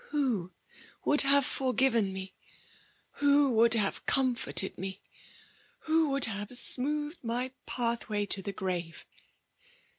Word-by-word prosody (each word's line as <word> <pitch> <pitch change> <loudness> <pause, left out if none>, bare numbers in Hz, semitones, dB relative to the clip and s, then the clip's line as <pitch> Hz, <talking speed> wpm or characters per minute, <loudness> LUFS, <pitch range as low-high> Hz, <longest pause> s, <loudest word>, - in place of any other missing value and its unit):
" - - -24
HTn 245 - -1 0.6
would 295 - +6
have 280 0 +4
forgiven 255 -6 0
me, 190 0 -8 0.8
who 285 -1 +3
Would 230 +1 +5
have 205 -3 -1
cmt^ 260 -2 +1
forted 190 - +2
me, 190 +1 -7 0.8
who 320 -1 +1
would 275 -1 +3
have 205 +2 -5
smoothed 295 +5 +1
my 245 +2 -3 0.2
path 235 -2 -3
vi^y 205 -1 -2
to 195 - +1
the 200 - -5
grave 180 -4 -5
240 Hz, 130 wpm, -29 LUFS, 200-275 Hz, 0.8 s, would